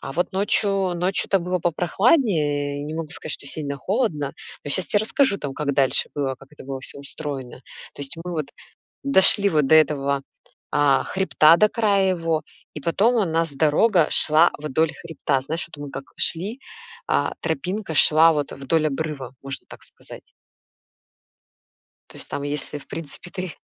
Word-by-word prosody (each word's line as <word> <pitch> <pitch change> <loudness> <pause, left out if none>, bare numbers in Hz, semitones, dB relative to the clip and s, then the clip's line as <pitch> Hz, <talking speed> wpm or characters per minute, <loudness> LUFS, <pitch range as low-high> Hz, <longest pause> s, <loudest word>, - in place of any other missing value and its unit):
А - - -7
вот 175 +7 -1
ночью, 195 -1 +2
ночью-то 185 +2 +1
было 180 +1 -2
попрохладнее, 165 - +1
не 150 +2 -5
могу 165 -1 -4
сказать, 155 0 -6
что - - -6
сильно 140 0 -3
холодно, 165 - -1 0.3
но 145 - -4
щас 180 +5 +1
те 205 - +2
расскажу 215 +1 +2
там, 140 -2 -5
как 145 0 -2
дальше 135 -1 +2
было, 135 -2 -1
как 135 +1 -17
это 150 - -13
было 135 0 -5
всё 135 - -5
устроено. 140 -3 -7 0.4
То - - -7
есть 140 +3 -5
мы 180 - -5
вот 155 -4 -2 0.6
дошли 200 -5 +5
вот 150 -4 +2
до 160 - +5
этого, 140 -3 +3 0.5
а, 145 -2 +3
хребта, 170 -4 +4
до 215 +4 +4
края 200 -4 +2
его, 165 -2 -1 0.3
и 150 - -6
потом 200 - +2
у 220 - +3
нас 165 -2 -1
дорога 160 +5 +3
шла 160 +3 +4
вдоль 150 +2 0
хребта. 155 -5 -2
Знаешь, 160 +5 -3
вот 145 -3 -10
мы 145 - -7
как 135 - -7
шли, 200 +10 -1 0.5
а - - 0
тропинка 195 -7 -3
шла 160 +2 +6
вот, 145 -2 -2
э, - - -8
вдоль 155 +3 0
обрыва, 140 -3 -5
можно 135 -1 -6
так - - -13
сказать. - - -14 1.8
То - - -13
есть - - -11
там, 140 - -3
если, 145 0 -4
в 140 - -17
принципе, 165 +2 -7
ты 185 -2 -6
160 Hz, 170 wpm, -23 LUFS, 145-185 Hz, 1.8 s, шла